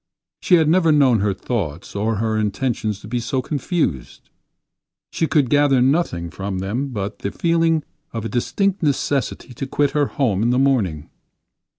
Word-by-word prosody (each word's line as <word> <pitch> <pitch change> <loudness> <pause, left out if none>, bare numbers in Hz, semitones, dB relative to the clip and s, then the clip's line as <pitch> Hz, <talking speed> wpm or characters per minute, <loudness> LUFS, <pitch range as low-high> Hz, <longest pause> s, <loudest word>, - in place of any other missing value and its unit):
She 180 - +4
had 160 -3 +3
never 165 0 +4
known 135 -6 +4
her 100 +1 +1
thoughts 95 - -4
or 110 +2 0
her 110 +1 -1
intentions 110 -1 -1
to - - -10
be 120 +2 -2
so 120 +3 -2
confused. 145 - -3 0.8
She 160 - 0
could 145 -5 +2
gather 145 -1 +3
nothing 125 - +1
from 95 0 -4
them 105 +9 -2
but 105 -5 -5
the 100 - -3
feeling 165 -2 +1 0.3
of 115 -1 -5
a - - -2
distinct 180 - 0
necessity 140 -4 -1
to 135 +3 -5
quit 145 +1 +1
her 145 -2 +1
home 110 -9 0
in 115 - +2
the 125 - +2
morning. 105 - +1
125 Hz, 170 wpm, -21 LUFS, 105-145 Hz, 0.8 s, She